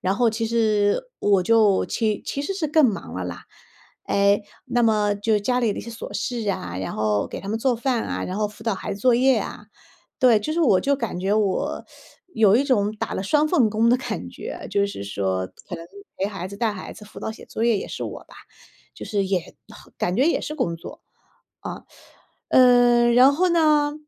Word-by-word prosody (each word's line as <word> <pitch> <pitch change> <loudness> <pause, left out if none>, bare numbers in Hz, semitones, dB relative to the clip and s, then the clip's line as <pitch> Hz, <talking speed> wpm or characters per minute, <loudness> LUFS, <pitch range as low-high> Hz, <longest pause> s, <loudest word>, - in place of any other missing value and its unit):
然 190 +1 0
后 235 0 +2
其 225 +1 -2
实 215 - +2 0.2
我 200 -2 +3
就 210 -1 +3
其 215 -3 -1
其 280 - -3
实 340 - -2
是 360 -5 -1
更 310 -1 +5
忙 215 -5 -4
了 95 - -4
啦。 90 -1 -7 0.6
诶， 200 +1 +2 0.2
那 245 -1 +1
么 210 -2 +2
就 210 +1 +1
家 250 +5 0
里 230 -4 +1
的 - - -7
一 - - -5
些 235 - -8
琐 225 - -8
事 235 -4 -3
啊， 90 - -5
然 95 - -4
后 105 -1 0
给 - - -7
他 195 - -8
们 220 +2 -1
做 255 +2 +1
饭 240 -1 0
啊， - - -3
然 185 - -4
后 210 0 +1
辅 210 - -14
导 225 -3 0
孩 205 +2 -5
子 200 - -11
作 250 +1 +4
业 260 +2 +4
啊。 - - -7 0.5
对， 245 -4 +5
就 305 - -3
是 340 - 0
我 230 - +4
就 280 - +1
感 230 -9 -4
觉 190 +2 0
我， 215 +9 -1 0.5
有 215 -3 +5
一 260 - +3
种 215 -7 +1
打 - - -4
了 - - -2
双 300 +9 +2
份 270 -11 +3
工 220 +2 +2
的 245 - +5
感 260 - -5
觉， - - -7
就 200 0 +2
是 150 - -7
说 95 -2 -2 0.2
可 185 - -5
能 165 0 -10 0.3
陪 195 - 0
孩 195 -3 -5
子、 200 - -9
带 220 0 0
孩 185 - -8
子， 210 - -13
辅 - - -12
导 220 - -4
写 - - -13
作 225 - -3
业 230 -3 +3
也 - - -6
是 - - -5
我 - - -7
吧。 - - -18 0.6
就 - - -8
是 200 -2 0
也 185 -3 -3 0.4
感 180 - 0
觉 265 +5 +3
也 - - +1
是 305 - -5
工 170 - -2
作。 165 - -11 0.7
嗯。 - - -7 0.7
呃， 245 -1 +5
然 255 +3 +6
后 360 +5 +2
呢， 305 -3 +3
220 Hz, 240 characters per minute, -23 LUFS, 200-250 Hz, 0.7 s, 然